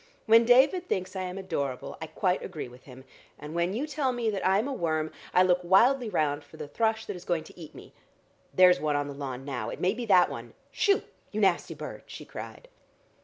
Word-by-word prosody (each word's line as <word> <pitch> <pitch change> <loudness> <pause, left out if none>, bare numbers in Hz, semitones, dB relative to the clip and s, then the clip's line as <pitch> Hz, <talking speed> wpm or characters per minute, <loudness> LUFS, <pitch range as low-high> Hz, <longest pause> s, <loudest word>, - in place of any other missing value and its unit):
When 230 +1 +6
David 280 +10 +4
thinks 185 +1 -2
I 190 - -2
am 180 0 -5
adorable, 140 -9 -4
I 160 - -4
quite 185 +2 -1
agree 160 -8 -6
with 125 +1 -16
him, 130 -1 -12 0.3
and 150 +1 -9
when 170 +1 0
you 240 +9 -2
tell 300 -4 -1
me 235 -3 -1
that 195 -2 -3
I 190 +1 +3
am 220 +6 0
a 280 - -3
worm, 155 -7 -1 0.2
I 185 - +5
look 180 -1 +3
wildly 230 +8 +4
round 150 -5 0
for - - -16
the - - -6
thrush 220 +8 0
that 205 - -5
is 180 - -10
going 170 -3 -1
to - - -15
eat 160 -3 -11
me. - - -13 0.6
There's 180 -1 +6
one 150 -1 0
on 145 0 -1
the 145 - -6
lawn 135 -2 -6
now; 125 -5 -4
it - - -7
may 185 +2 +2
be 235 +1 -5
that 185 -3 +5
one. - - -8 0.2
Shoo! 405 -2 +2 0.3
you 215 - -3
nasty 190 -4 +1
bird!" - - -8
she - - -9
cried. - - -9
185 Hz, 230 wpm, -28 LUFS, 155-225 Hz, 0.6 s, When